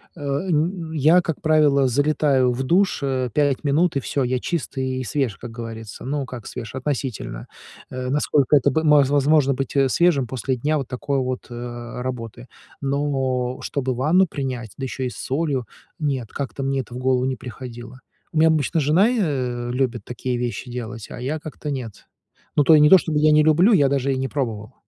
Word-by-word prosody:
Э, - - -13
н 160 +4 -1
я, 160 +4 +4
как 160 -4 -4
правило, 150 -4 +4
залетаю 140 -1 +2
в 125 +2 -3
душ, 180 +8 +2
э, 130 -2 -1
5 145 -2 +1
минут, 155 +3 +2
и - - +2
всё, 135 +1 -1
я 125 0 0
чист 155 -5 -4
и 130 0 -2
свеж, 125 -7 -1
как 120 - -8
говорится. 115 -2 -8
Ну, 140 0 -2
как 120 -4 -8
свеж, 120 -1 -7
относительно, 130 - -4 0.4
э, 125 0 -4
насколько 145 0 +2
это 140 - +4
б 160 +5 0
возможно 145 -1 +4
быть 135 - -3 0.2
свежим 170 -8 +3
после 130 +1 -2
дня 150 +5 0
вот 135 -3 -4
такой 140 +2 -2
вот, 130 -1 -3
э, 120 0 -7
работы. 120 -2 -6 0.3
Но 135 -3 -1
чтобы 130 -3 -2
ванну 165 +8 +3
принять, 130 -7 -5
да 135 - -6
ещё 130 0 -4
и 125 - -1
с - - -10
солью, 135 -3 -1 0.3
нет, 135 -7 -2
как-то 140 0 -5
мне 135 0 0
это 120 - -12
в 125 - -5
голову 130 0 +1
не 130 0 -1
приходило. 125 0 -9 0.3
У 160 - -4
меня 160 +1 +6
обычно 155 +1 +1
жена 160 - +4
и, 245 - 0
э, 125 - -1
любит 125 -4 -1
такие 125 0 -3
вещи 125 +1 -4
делать, 120 -2 -6
а - - -8
я 140 +5 -3
как-то 150 -1 -6
нет. 120 -6 -6 0.5
Ну, 145 - +4
то 155 +2 +7
не 150 0 +6
то 190 - +10
чтобы 155 -2 -2
я 155 0 +4
не 150 0 +5
люблю, 170 +8 +5
я 140 -7 +4
даже 140 -1 0
и 130 - -2
не 135 0 -1
пробовал. 115 -5 -4
135 Hz, 195 wpm, -22 LUFS, 125-150 Hz, 0.5 s, то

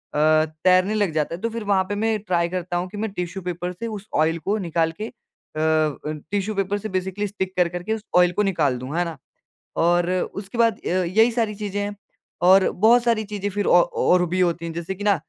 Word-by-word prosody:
तैरने 155 +6 +3
लग 205 -5 +1
जाता 155 +1 -1
है 180 - -12
तो 230 - -1
फिर 225 -1 -5
वहाँ 195 -2 +2
पे 205 - -1
मैं 220 +1 +1
ट्राई 175 -4 0
करता 180 -1 -3
हूँ 180 +1 -2
कि 205 - -9
मैं 220 +1 -2
टिश्यू 180 0 -5
पेपर 180 0 -3
से 230 +6 -6
उस 210 -1 -7
ऑयल 160 +2 +2
को 205 +2 +1
निकाल 165 -3 0
के 220 - -2
अ, - - -11 0.5
टिश्यू 155 +6 -1
पेपर 195 +1 0
से 215 +1 -6
बेसिकली 190 +2 -2
स्टिक 190 -1 -4
कर, 180 -1 +4
कर 175 0 -6
के 220 +3 -1
उस 220 -1 -5
ऑयल 180 0 +5
को 210 +4 0
निकाल 155 -10 +1
दूँ। 130 +5 -6
है 175 - +2
ना? 165 -2 -6 0.6
और 175 +1 +2 0.2
उसके 200 +3 -7
बाद 230 -2 +3
अ, - - -8
यही 185 +6 +3
सारी 225 -3 -1
चीज़ें 205 -1 -4
हैं 205 0 -3 0.5
और 190 +1 +6
बहुत 230 +5 +4
सारी 230 -2 +1
चीज़ें 205 -1 -4
फिर 205 0 -2
औ 175 - +6 0.2
और 180 0 +4
भी 185 +1 -1
होती 170 -2 +1
हैं 165 - -4
जैसे 170 +3 -4
कि 205 - -7
ना 205 -2 +4
185 Hz, 230 wpm, -23 LUFS, 170-205 Hz, 0.6 s, और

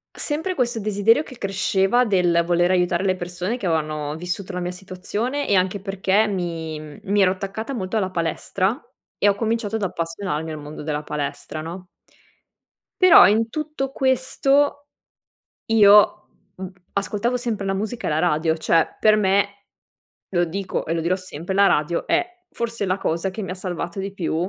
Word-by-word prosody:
Sempre 320 +5 -2
questo 240 -6 -1
desiderio 215 +7 +2
che 255 -5 -13
cresceva 195 +4 +1
del 175 -4 +2
voler 175 0 +2
aiutare 180 0 +1
le 185 -1 +2
persone 180 +5 -4
che 240 - -6
avevano 155 -3 -1
vissuto 180 +3 -5
la 180 - -3
mia 175 - -3
situazione 195 +9 -4
e 200 - +3
anche 185 +2 +1
perché 195 +2 +1
mi 160 -6 -5
mi 205 +1 +2
ero 185 - +4
attaccata 195 +7 -5
molto 200 -1 -2
alla 190 -3 -1
palestra 185 - -1 0.4
e - - +2
ho 200 - +5
cominciato 225 0 -1
ad 220 - -7
appassionarmi 165 -3 -3
al 155 - -6
mondo 150 +1 -8
della 150 -1 -2
palestra 150 +1 -5
no? 180 +3 -8 1.1
Però 370 - +9
in 225 +3 +2
tutto 305 -2 -4
questo 275 +2 +1 0.8
io, 210 -2 +5 0.3
mhmm, 190 -1 -6 0.2
ascoltavo 210 +5 -1
sempre 225 -5 -3
la 195 - 0
musica 215 +4 -4
e - - 0
la 150 - +1
radio, 160 -1 +1
cioè 165 0 +1
per 215 0 +5
me, 200 0 +1 0.6
lo 175 -2 +2
dico 190 +3 -4
e 165 - -1
lo 165 - -1
dirò 175 +3 +1
sempre, 185 0 -6
la 200 0 +5
radio 170 +1 +1
è 355 - +2 0.2
forse 230 -3 -3
la 185 +2 0
cosa 170 +3 -1
che 210 +3 -6
mi 190 - -5
ha 185 - -3
salvato 180 -1 -5
di 195 0 -4
più 175 -5 -3
190 Hz, 170 wpm, -22 LUFS, 175-220 Hz, 1.1 s, Però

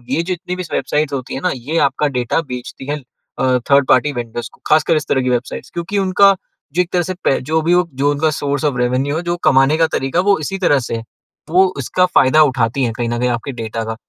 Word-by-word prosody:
ये 165 - 0
जितनी 180 0 -4
भी 185 - -4
वेबसाइट्स 150 -1 -1
होती 130 -2 -4
हैं 135 - -4
ना, - - 0
ये 135 +6 -4
आपका 150 - -1
डाटा 125 +6 0
बेचती 125 +1 -7
हैं, 145 +1 -2 0.4
अ, 130 -1 +2
थर्ड 140 -1 +5
पार्टी 150 - +3
वेंडर्स 120 -1 -5
को, - - -22
ख़ासकर 155 +2 +4
इस 155 0 -2
तरह 130 - +2
की 125 - 0
वेबसाइट्स, 125 0 -3
क्योंकि 175 +4 -3
उनका 195 +1 +4 0.4
जो 180 - +3
एक 180 - -4
तरह 175 -1 +2
से 185 - -3
पै 135 - +2
जो 160 0 +3
भी 170 +3 +2 0.3
उनका 145 +2 +2
सोर्स 140 0 -1
ऑफ़ 140 -4 0
रेवेन्यू 125 +4 0
है, - - -2
जो 175 0 -2
कमाने 135 +3 +4
का 165 0 +3
तरीका 135 +5 -1
है, - - +2
वो 205 -1 +4
इसी 195 +6 -3
तरह 145 -7 +3
से - - -2
है। 115 - -5 0.5
वो 185 +4 +5
उसका 160 +7 +1
फ़ायदा 155 -4 +4
उठाती 130 -2 0
हैं 115 -2 0
कहीं 120 0 -3
न 120 0 -2
कहीं 125 +1 +1
आपके 120 +3 -3
डेटा 115 -2 -4
का। 110 0 -4
145 Hz, 245 wpm, -17 LUFS, 125-170 Hz, 0.5 s, थर्ड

